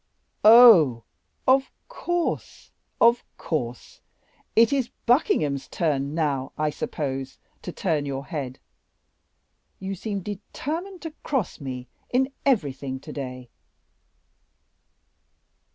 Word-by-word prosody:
"Oh! 210 - +8 0.4
of 265 +1 +4 0.2
course, 350 -8 -3 0.3
of 235 +1 +5
course; 125 -7 -4 0.5
it 230 +3 +5
is 265 -4 0 0.2
Buckingham's 150 - +2
turn 145 -3 -1
now, 140 -5 -1
I 155 0 0
suppose, 135 -3 -4 0.2
to 180 - -6
turn 155 -6 -1
your 135 0 -4
head. 140 -6 -5 1.2
You 195 0 -4
seem 200 +1 -4
determined 320 - -6
to 325 - -5
cross 265 -10 -2
me 125 -2 -6 0.2
in 265 +2 +1
everything 140 - 0
to - - -10
day." 125 -3 -7
160 Hz, 100 wpm, -25 LUFS, -, 1.2 s, Oh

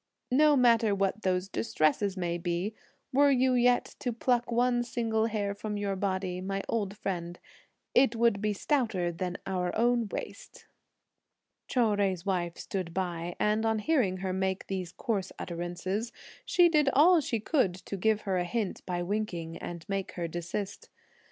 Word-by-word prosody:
No 295 +2 +5
matter 230 -4 +4
what 195 +2 0
those 185 -1 0
distresses 195 0 0
may 175 -1 -1
be, 175 +4 -2 0.4
were 285 +2 +5
you 260 -1 +3
yet 245 0 +2
to 245 - -1
pluck 240 +1 0
one 240 +1 +2
single 225 -2 0
hair 205 -3 -1
from 210 +1 -4
your 200 -1 -1
body, 185 -2 -2
my 195 +1 -3
old 205 -3 -2
friend, 175 -2 -4 0.6
it 250 -2 +4
would 230 -3 +2
be 210 0 +1
stouter 205 - 0
than 180 +1 -4
our 180 -2 -1
own 235 0 +2
waist." - - -7 1.0
Chou 250 - +1
Jui's 190 -3 0
wife 175 -3 -1
stood 185 -4 -4
by, 175 -2 -2
and 215 +1 +2
on 225 0 +2
hearing 215 - +1
her 185 - -1
make 190 0 -1
these 185 -3 -4
coarse 200 -6 -2
utterances, 180 +6 -3 0.3
she 350 -1 +5
did 300 -4 +3
all 330 +4 +6
she 235 -5 -1
could 215 - +1
to 190 +2 -7
give 215 +2 +1
her 190 -3 0
a - - +1
hint 210 +2 -3
by 175 -1 -1
winking, 175 -4 -3
and 170 0 -7
make 195 -2 -3
her 170 -1 -3
desist. 175 +4 -5
200 Hz, 165 wpm, -29 LUFS, 180-235 Hz, 1.0 s, all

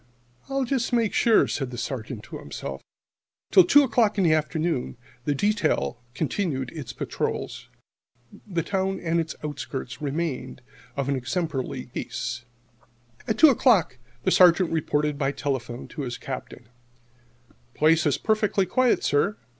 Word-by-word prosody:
"I'll 275 0 0
just 250 -1 -1
make 230 -4 +1
sure," 230 -2 +4
said 135 -3 -2
the 125 - -7
Sergeant 115 -1 -5
to - - -8
himself. 70 -1 -7 0.7
Till 185 - +8
two 290 +11 +6
o'clock 225 -4 +2
in 195 - +3
the 165 -3 +4
afternoon 155 -3 -1 0.3
the 145 - +1
detail 205 - 0
continued 140 -4 -2
its 150 -7 -7
patrols. - - -4 0.8
The 175 -5 -1
town 190 +1 -1
and 170 0 0
its 165 0 -3
outskirts 145 -1 -5
remained 140 -4 -3 0.3
of 140 -1 -1
an 140 - +1
exemplary 130 -1 -3
peace. 120 +1 -4 0.8
At 220 - 0
two 315 - +8
o'clock 205 - +3 0.2
the 185 - +2
Sergeant 180 -1 +5
reported 150 -2 0
by 135 -1 +1
telephone 130 -3 -4
to 155 - -6
his 125 -3 -4
Captain: 130 -3 -7 1.1
"Place 160 +1 +4
perfectly 210 -3 +1
quiet, 250 +7 +2
sir. 145 -7 +1
155 Hz, 140 wpm, -25 LUFS, 135-195 Hz, 1.1 s, Till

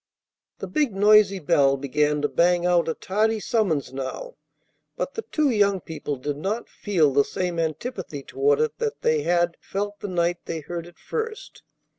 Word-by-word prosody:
The - - -5
big, 295 -9 0
noisy 205 0 +5
bell 140 -4 +3
began 150 +2 0
to - - +3
bang 175 +2 +2
out 175 -1 +3
a 160 - -1
tardy 220 +3 0
summons 190 - 0
now; 135 - -5 0.6
but - - -3
the 450 - -3
two 305 -9 0
young 200 -3 +3
people 150 -3 -5
did 145 +2 -4
not 205 +9 -3
feel 165 -9 +1
the 140 +1 +5
same 180 +1 -3
antipathy 160 - -4
toward 435 - +1
it 460 - -1
that 450 -1 -2
they 470 -1 +2
had 175 - +1
felt 205 +1 -4
the - - -5
night 175 -1 0
they 165 -1 -4
heard 170 +2 -6
it 175 - -16
first. 455 +2 -5
180 Hz, 175 wpm, -24 LUFS, 155-220 Hz, 0.6 s, noisy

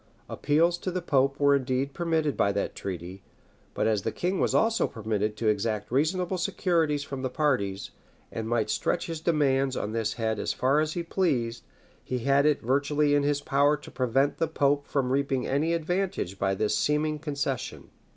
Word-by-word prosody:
Appeals 165 +4 +1
to 185 - -3
the 185 0 -2
pope 140 -5 +1
were 140 0 +5
indeed 135 +1 -1
permitted 160 -4 0
by 100 - +2
that 100 - -2
treaty; 95 0 -6 0.5
but - - 0
as 110 -2 +2
the - - -2
king 180 +2 -2
was - - +1
also 225 0 +3
permitted 105 -1 -2
to 115 - -1
exact 105 0 0
reasonable 180 +7 0
securities 165 -6 0
from 135 -2 -6
the 130 - -2
parties, 125 -9 -1 0.4
and 110 0 -4
might 110 -2 0
stretch 175 - 0
his 165 -2 -5
demands 135 -5 +1
on 105 - -3
this 110 -1 -1
head 110 -2 -2
as - - -1
far 135 +3 +2
as 155 0 0
he 175 - -3
pleased, 125 -11 -1 0.4
he 130 - -3
had 140 +4 +3
it 150 -2 +1
virtually 145 +4 +2
in 145 - +4
his 145 0 0
power 145 +2 +2
to 145 - -13
prevent 135 +3 +1
the 165 - +1
pope 145 -2 +1
from 130 -3 0
reaping 135 -1 0
any 145 +5 0
advantage 170 - -2
by 95 0 +1
this 105 +1 0
seeming 150 +1 0
concession. 145 -4 -4
140 Hz, 185 wpm, -27 LUFS, 115-155 Hz, 0.5 s, were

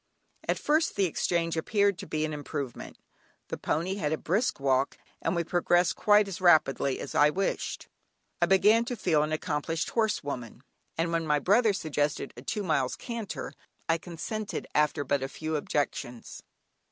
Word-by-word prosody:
At - - +2
first 310 +2 +1
the 200 - +3
exchange 165 -1 0
appeared 200 +3 +1
to - - -7
be 155 0 -1
an 155 - -4
improvement. 145 -3 -5 0.5
The - - -3
pony 180 +5 -1
had 150 -6 -1
a 160 - +1
brisk 200 - 0
walk, 135 0 +1 0.2
and - - 0
we 170 - +1
progressed 175 +1 +2
quite 210 0 +4
as 190 -1 -6
rapidly 150 -6 +4
as - - -6
I 150 +1 +5
wished. 190 +5 -2 0.5
I - - +4
began 210 +4 +5
to 245 0 -3
feel 165 -9 +2
an 155 +1 -1
accomplished 155 +1 -2
horse 220 -6 +1
woman, 125 -3 -6 0.3
and 165 +1 0
when 165 -1 0
my 150 -1 +3
brother 210 - +4
suggested 150 -6 -2
a - - -9
two 210 -2 -3
miles 140 -8 0
canter, 230 -5 -5 0.3
I 165 0 +2
consented 190 +6 -5
after 150 -1 +2
but 140 0 0
a 135 - -3
few 155 +2 -4
objections. 140 -5 -3
165 Hz, 170 wpm, -28 LUFS, 150-195 Hz, 0.5 s, I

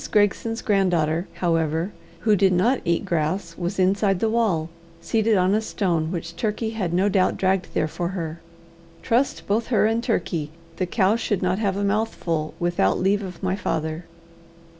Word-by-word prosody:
Gregson's 215 +2 +1
granddaughter, 175 -5 +1
however, 165 +1 0 0.3
who 215 -2 +4
did 195 -1 +3
not 235 +9 +2
eat 170 +2 0
grass, 170 0 -1
was 175 +3 -3
inside 195 0 +2
the 220 +2 +1
wall, 205 -9 +1 0.3
seated 220 +2 +1
on 185 +1 +3
a 215 - +2
stone 170 -7 -1
which 170 -1 -5
Turkey 220 0 -1
had 200 -7 -2
no 185 +3 +2
doubt 190 -2 +2
dragged 190 -1 +1
there 155 - +2
for 175 +2 -3
her. 165 -1 -5 0.6
Trust 250 +4 +1
both 220 +3 0
her 225 -4 +3
and 225 +2 +1
Turkey, 170 - -1 0.3
the 185 - -1
cow 195 +2 +2
should 205 -4 -1
not 185 +2 +1
have 200 -3 0
a 200 - -1
mouthful 200 -7 -1
without 175 - +1
leave 200 +2 +2
of 185 -3 -8
my 190 0 +1
father. 160 -3 -3
190 Hz, 170 wpm, -23 LUFS, 170-210 Hz, 0.6 s, who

